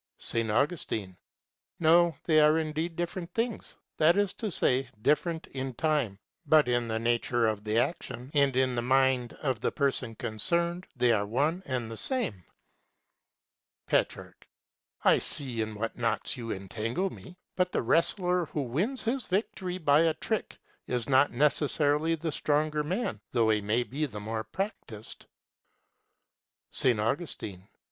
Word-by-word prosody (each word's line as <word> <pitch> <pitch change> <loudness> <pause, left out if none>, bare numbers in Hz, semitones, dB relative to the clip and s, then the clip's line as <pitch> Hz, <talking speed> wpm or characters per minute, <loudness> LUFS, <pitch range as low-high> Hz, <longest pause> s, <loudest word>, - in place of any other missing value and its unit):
S. - - -5 0.2
Augustine. 110 - -1 0.6
No, 170 0 +5
they 155 -2 +4
are 150 +1 +5
indeed 160 +1 -2
different 175 +1 -4
things; 230 -1 -2 0.2
that 165 +4 +5
is 205 -2 +1
to 220 - -4
say, 130 -6 +1
different 160 +3 +1
in 130 -2 -5
time, 140 -8 0 0.3
but 150 -2 +5
in 120 -1 +1
the 110 0 -1
nature 120 +1 +1
of 110 -2 -1
the 110 +1 0
action 125 -1 -2
and 140 -3 +3
in 130 -1 +2
the 120 - 0
mind 130 -1 +2
of 130 -6 -1
the - - 0
person 130 -5 0
concerned 170 - -1
they 125 -1 +3
are 105 -2 +1
one 150 - 0
and 125 -4 -2
the 115 - -6
same. 225 - -2 1.4
Petrarch. - - -1 0.6
I - - +5
see 125 -5 -3
in 110 -1 -3
what 115 +2 -3
knots 120 +2 -1
you 115 -3 -5
entangle 115 - -2
me. 180 0 -12 0.2
But 180 -1 +1
the - - 0
wrestler 180 - +2
who 150 - -2
wins 180 - -2
his 250 0 -1
victory 190 -2 -2
by 150 -3 +4
a 165 -1 +2
trick - - -3 0.3
is 125 -2 -1
not 140 +1 +5
necessarily 150 +3 +2
the 160 0 -3
stronger 150 +1 0
man, 155 - -2
though 115 -3 +3
he 105 -1 +2
may 110 +4 +1
be 145 +5 -2
the 105 -6 -7
more 110 +1 -4
practised. 155 - -6 1.5
_S. 125 -4 +3
Augustine. 105 - -3
140 Hz, 150 wpm, -29 LUFS, 115-165 Hz, 1.5 s, No